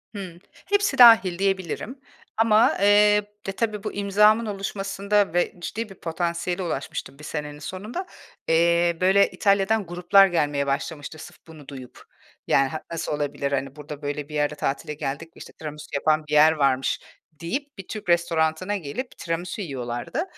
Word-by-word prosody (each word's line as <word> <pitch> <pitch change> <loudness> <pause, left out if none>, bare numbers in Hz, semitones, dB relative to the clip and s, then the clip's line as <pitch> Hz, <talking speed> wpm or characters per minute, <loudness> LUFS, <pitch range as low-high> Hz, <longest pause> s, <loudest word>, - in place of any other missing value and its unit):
Hıı. 185 -4 -7 0.3
Hepsi 405 -8 +1
dâhil 225 -7 +7
diyebilirim. 195 - -2 0.4
Ama, 225 0 +4
eee, 200 - +4 0.6
ya, 195 - -3
tabii 210 -1 -2
bu - - -4
imzamın 210 +3 +3
oluşmasında 200 -1 -1
ve 175 0 +1
ciddi 215 +5 -5
bir 195 - -12
potansiyele 170 +2 -3
ulaşmıştım 140 -3 -5
bir - - -12
senenin 150 -1 -5
sonunda. 210 - -6 0.4
Eee, 170 +1 +3
böyle 195 +2 +4
İtalya'dan 200 +1 +2
gruplar 180 +3 +4
gelmeye 145 -5 0
başlamıştı, 145 +2 -3
sırf 175 +2 -11
bunu 155 -4 -13
duyup. 130 -3 -11 0.4
Yani, 135 0 +3
ha 155 +3 -5
nasıl 165 - -3
olabilir, 145 -1 -2
hani, 135 0 -2
burada 150 0 -9
böyle 145 0 -4
bir 150 - -7
yerde 150 0 0
tatile 145 +1 -3
geldik, 145 +3 -5
işte, - - -12
tiramisu 150 -1 -8
yapan 155 +2 +2
bir 150 - -5
yer 150 +1 +7
varmış 135 -4 +1 0.3
deyip 255 - -5
bir 195 - -9
Türk 215 -4 -7
restoranına 170 +2 +1
gelip 195 - -6
tiramisu 170 +4 -4
yiyorlardı. 125 - -4
170 Hz, 155 wpm, -24 LUFS, 150-200 Hz, 0.6 s, dâhil